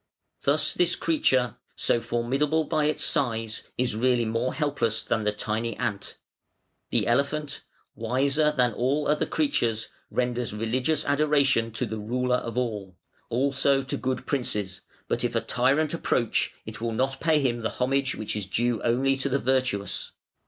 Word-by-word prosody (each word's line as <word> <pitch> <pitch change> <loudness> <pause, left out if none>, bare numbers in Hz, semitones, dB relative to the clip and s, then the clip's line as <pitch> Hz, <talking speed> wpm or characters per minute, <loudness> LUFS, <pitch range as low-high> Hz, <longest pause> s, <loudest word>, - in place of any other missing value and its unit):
Thus 145 +3 +3
this 175 -1 +2
creature, 130 -7 +1 0.2
so 120 - +1
formidable 135 +7 0
by 155 -1 0
its 150 0 +1
size, 115 -4 0
is 125 -3 0
really 120 +1 +2
more 115 +3 0
helpless 140 -7 0
than 110 -3 -1
the 105 - +3
tiny 110 +2 -2
ant. 100 -1 -3 0.7
The - - +1
elephant, 140 +4 0 0.3
wiser 140 +6 +2
than 125 -5 +2
all 140 +6 0
other 150 +1 +1
creatures, 115 - 0 0.2
renders 125 -3 -1
religious 125 +8 0
adoration 140 -5 +3
to 120 +3 -1
the 110 -1 -5
Ruler 125 +4 0
of 115 -1 -5
all: 105 -7 -3 0.3
also 135 +2 +2
to 130 - -2
good 130 0 -2
princes, 105 -9 -2 0.3
but - - -1
if - - -1
a - - +4
tyrant 145 +5 +1
approach, 120 -8 0
it 110 +1 -8
will 115 -1 -1
not 135 +3 -1
pay 160 -2 +3
him 125 -4 0
the 115 - -1
homage 135 +1 0
which 110 - -3
is 105 -3 -3
due 120 +2 0
only 130 +3 +2
to 140 +1 -1
the 135 - +2
virtuous. 130 -6 -1
125 Hz, 160 wpm, -26 LUFS, 115-140 Hz, 0.7 s, a